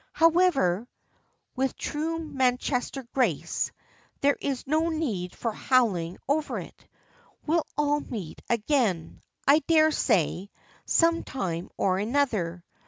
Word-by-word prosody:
"However," 320 - +3 0.7
with 265 +1 0
true 320 +2 -2
Manchester 265 -3 -1
grace, 230 - 0 0.5
"there's 280 -2 0
no 315 +4 +1
need 225 - -2
for 230 - -2
howling 205 -9 +1
over 295 +2 0
it. - - -10 0.6
We'll 325 +1 +1
all 295 0 +2
meet 205 - -7
again, 225 - 0 0.3
I 285 +3 +7
dare 315 -1 +4
say, 185 - +1 0.4
some 335 0 +3
time 175 -9 -4
or 185 -1 +1
other. 210 -8 0
260 Hz, 105 wpm, -27 LUFS, 195-305 Hz, 0.7 s, I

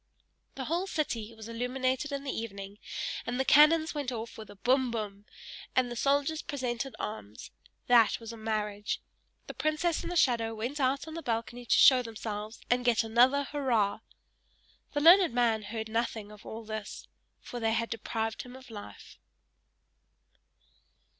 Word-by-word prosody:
The 265 - -4
whole 345 +6 -1
city 235 - -2
was 220 0 -9
illuminated 255 +4 -1
in 280 0 -3
the 275 - -2
evening, 200 -2 -6 0.5
and 245 +2 -2
the 265 - +1
cannons 315 +3 +6
went 285 -4 -2
off 230 -1 -5
with 220 -2 -10
a - - -11
bum! 255 +6 +2
bum! 210 -3 -5 0.5
and 250 -1 +2
the - - -4
soldiers 285 +4 +1
presented 255 -1 -3
arms. 110 - -7 0.3
That 235 -3 +5
was 230 0 -8
a - - -9
marriage! 210 -2 -2 0.5
The - - -7
princess 310 +2 0
and - - -5
the - - -3
shadow 230 -7 +2
went 245 +7 -4
out 270 +3 +1
on 315 - -7
the 330 - -5
balcony 235 -1 -3
to - - +4
show 260 -2 +8
themselves, 220 -2 -6
and 245 0 +2
get 240 -3 +3
another 250 +5 +4
hurrah! 245 -9 0 0.9
The 290 - 0
learned 340 -3 +7
man 230 -3 +3
heard 220 +1 -5
nothing 220 -2 -2
of 210 -1 -13
all 225 +1 -6
this 215 -1 -6 0.3
for 245 - -7
they 225 -1 +1
had 230 0 -1
deprived 225 0 -3
him 250 0 -11
of 260 -2 -13
life. 205 - -10
240 Hz, 165 wpm, -30 LUFS, 220-270 Hz, 0.9 s, show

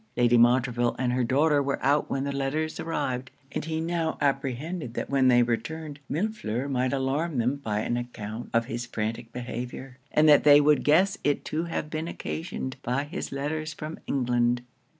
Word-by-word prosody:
Lady 120 0 +4
Montreville 120 0 +3
and 125 -1 0
her 125 0 +1
daughter 145 +4 +3
were 140 0 -1
out 145 +2 +3
when 135 - -1
the 140 - -2
letters 140 +3 -2
arrived; 130 -6 -2 0.2
and - - -3
he 160 0 -2
now 165 -1 -1
apprehended 140 0 -2
that - - -4
when 135 -2 +4
they 120 -1 +6
returned 145 +5 -3
Millefleur 145 - -2
might 130 -2 0
alarm 140 +3 -1
them 125 +4 +1
by 105 -6 -2
an 120 - -1
account 120 -2 -6
of 115 0 +2
his 120 +1 -4
frantic 115 +1 -4
behaviour, 125 +2 -6
and 155 +1 +4
that 150 -2 +7
they 145 -1 +8
would 150 0 +4
guess 185 +7 +3
it 145 0 0
to 160 +2 -2
have 155 -2 -4
been 155 +1 -3
occasioned 160 -6 -5
by 125 +4 -1
his 155 +6 -5
letters 150 +3 -3
from 155 +2 -6
England. 120 -2 +1
135 Hz, 180 wpm, -27 LUFS, 120-155 Hz, 0.2 s, they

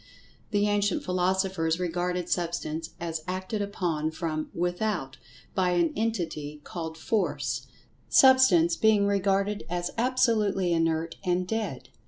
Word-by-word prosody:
The 205 -1 +2
ancient 205 -1 +1
philosophers 180 -2 0
regarded 180 0 -1
Substance 165 -2 -2
as 165 -2 -3
acted 185 +3 -3
upon 175 -6 -1
from 160 -1 -3
without 175 -4 -2 0.4
by 180 -2 +1
an 170 -2 +2
entity 170 -9 -2
called 160 -2 -6
Force, 210 +6 -1 0.4
Substance 240 -11 +6
being 210 +2 +4
regarded 200 +1 +1
as 175 0 -2
absolutely 220 -7 +2
inert 165 0 0
and 180 -1 0
"dead." 210 - -3
180 Hz, 115 wpm, -27 LUFS, 165-205 Hz, 0.4 s, Substance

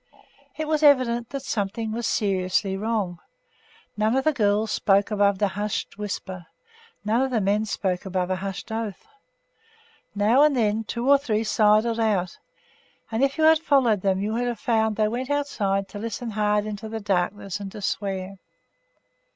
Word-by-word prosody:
It 310 -1 -3
was 310 -1 +1
evident 255 -5 +4
that 275 -1 -5
something 220 -1 -2
was 235 +1 -2
seriously 190 -1 0
wrong. 200 -4 -2 0.8
None 215 +3 +1
of 265 - +1
the 310 - +2
girls 210 -2 +1
spoke 200 +1 +2
above 200 -2 +2
a 205 - +2
hushed 205 +2 -3
whisper. 185 -4 -5 0.6
None 225 +4 +2
of 265 - +1
the 245 -3 0
men 205 +2 +1
spoke 190 -3 -2
above 185 -1 -2
a 185 - 0
hushed 195 +3 -6
oath. 220 - -4 1.1
Now 215 +6 +4
and 295 -3 +4
again 220 -1 +1
two 235 +4 -3
or 280 0 +6
three 225 -6 -1
sidled 215 +1 +3
out, 200 -6 0 0.7
and 225 +4 0
if 275 +2 +1
you 315 - +1
had 320 0 +6
followed 260 - +2
them 190 -1 +1
you 215 +1 -2
would 245 +2 -1
have 240 -3 -3
found 220 -2 +1
that 215 - +1
they - - +3
went 250 +4 -3
outside 205 -9 -1
to 205 - -8
listen 230 +1 -4
hard 210 0 +1
into 215 0 -6
the 225 0 -4
darkness 195 0 -2
and 200 -1 -7
to 210 - -9
swear. 195 -1 -3
215 Hz, 175 wpm, -24 LUFS, 200-235 Hz, 1.1 s, or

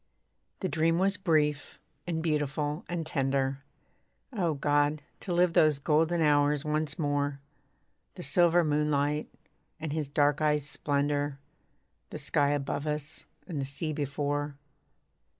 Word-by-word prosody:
The 190 - 0
dream 165 -1 +2
was 195 +2 +2
brief, 150 -5 0 0.3
and 160 -2 -2
beautiful, 150 0 -1
and 175 -2 -2
tender, 135 -2 0 0.7
(O 175 -8 0
God! 145 +1 +1 0.2
to 185 - -6
live 175 0 +3
those 155 -4 +4
golden 160 +4 +2
hours 145 -1 +3
once 150 0 -1
more. 145 -2 -1 0.8
The - - -8
silver 175 0 +4
moonlight, 150 -1 +1 0.5
and 155 -2 -4
his 155 -3 -2
dark 145 0 +2
eyes' 150 -2 +2
splendour, 145 0 -1 0.7
The - - -6
sky 145 -1 +1
above 145 +1 -2
us, 150 0 -4 0.2
and 160 -7 -4
the - - -2
sea 155 +3 -3
before.) 145 0 -2
150 Hz, 130 wpm, -29 LUFS, 145-160 Hz, 0.8 s, those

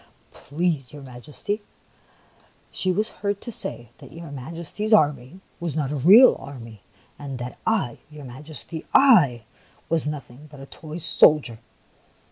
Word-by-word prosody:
" - - -34
Please 150 -4 -1
your 145 -1 -10
Majesty, 140 - -6 1.1
she 185 - 0
was 210 +5 0
heard 200 -1 -1
to 240 - -7
say 120 - -6
that 135 - -13
your 165 -2 -10
Majesty's 165 - -4
army 150 - +2 0.2
was 170 -4 -4
not 145 -3 -1
a - - -2
real 195 - +7
army, 115 -6 -11 0.4
and 140 -3 -6
that 125 0 -7
I, 200 - 0
your 150 -2 -11
Majesty, 150 +5 -7
— - - -33 1.0
/was 160 -3 +1
nothing 145 -1 -7
but 145 -1 -14
a 135 - -9
toy 155 +3 -10
soldier 150 -7 +4
150 Hz, 145 wpm, -23 LUFS, 135-170 Hz, 1.1 s, real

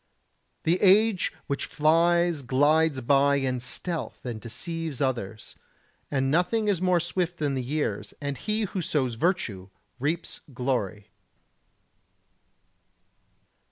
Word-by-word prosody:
The 175 +3 +2
age 205 0 +4
which 140 -2 -2
flies 170 +1 +3
glides 145 +2 +3
by 140 +3 +4
in 130 -2 0
stealth 160 +7 -4
and 115 -3 -4
deceives 160 +6 -4
others; 115 -6 -3 0.5
and 135 -1 0
nothing 180 +7 +2
is 195 -4 +1
more 180 -1 +3
swift 175 +1 -2
than 145 -3 0
the 130 - -1
years, 145 +5 -2
and 145 -1 -3
he 215 +8 -1
who 190 -2 -3
sows 135 -6 0
virtue 115 - -1 0.3
reaps 155 +6 -2 0.2
glory. 120 -6 -2
150 Hz, 115 wpm, -27 LUFS, 130-175 Hz, 0.5 s, age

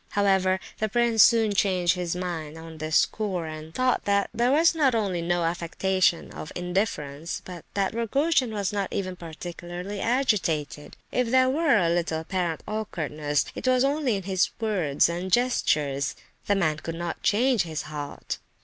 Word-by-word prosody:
However, 190 -2 +2 0.2
the 215 - 0
prince 235 0 +3
soon 225 -2 +5
changed 185 -2 +2
his 180 -2 -3
mind 165 -4 -4
on 160 -1 -10
this 155 0 +1
score, 190 -6 0
and 155 0 -7
thought 255 +6 +1
that 200 0 +1
there 240 +2 +2
was 325 +4 +5
not 280 -7 +2
only 195 -6 0
no 175 0 0
affectation 175 +2 0
of 155 - -8
indifference, 175 -5 -2
but 180 -3 -9
that 195 0 0
Rogojin 255 +3 +1
was 205 -2 -2
not 200 -2 -2
even 185 -2 -3
particularly 175 +3 -7
agitated. 190 - 0
If 250 -2 0
there 260 +1 +4
were 295 -4 +3
a 175 -4 +2
little 165 -1 0
apparent 175 -1 -2
awkwardness, 155 -9 -2
it - - -5
was 255 0 +4
only 280 -4 +1
in 195 - -4
his 190 0 +1
words 185 -11 +2
and 175 +3 -4
gestures. 150 - +1 0.3
The 205 - +3
man 155 -6 +1
could 165 +1 -6
not 170 0 -4
change 240 +1 +3
his 160 -2 -3
heart. 150 -2 -6
185 Hz, 165 wpm, -26 LUFS, 165-220 Hz, 0.3 s, soon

